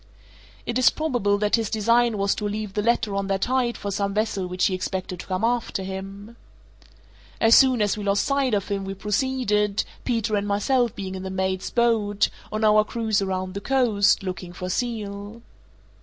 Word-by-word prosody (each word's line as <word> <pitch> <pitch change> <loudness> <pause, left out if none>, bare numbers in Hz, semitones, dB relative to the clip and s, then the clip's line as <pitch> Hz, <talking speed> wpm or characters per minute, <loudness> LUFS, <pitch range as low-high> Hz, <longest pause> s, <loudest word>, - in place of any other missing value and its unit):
It 240 +1 -1
is 255 - +6
probable 245 -10 0
that 210 +2 +2
his 225 -3 -2
design 230 +1 +2
was 200 0 +1
to 210 - -3
leave 210 -1 -4
the 210 - 0
letter 220 -2 +1
on 195 0 -1
that 195 0 0
height 250 -1 0
for 200 - -4
some 200 0 -2
vessel 210 -3 -1
which 180 0 0
he 190 - +1
expected 185 -1 -4
to - - -9
come 185 +2 -2
after 235 -4 0
him. 195 +4 -7 1.0
As 225 0 +5
soon 255 -4 +6
as 205 - +1
we 210 - -6
lost 200 0 +1
sight 275 -4 +1
of 200 0 -2
him 200 -1 -2
we 195 0 -5
proceeded 210 -1 0 0.2
(Peters 230 -3 0
and 205 0 -2
myself 235 +4 +1
being 190 -2 -5
in 190 - -5
the 190 - -5
mate's 190 0 -2
boat) 225 -4 +2 0.2
on 215 +1 -2
our 215 0 +5
cruise 220 -2 -1
around 185 -1 -2
the 200 - -5
coast, 215 -7 +2
looking 180 -1 -5
for 180 +1 -5
seal. 215 -1 -4
205 Hz, 190 wpm, -24 LUFS, 195-230 Hz, 1.0 s, is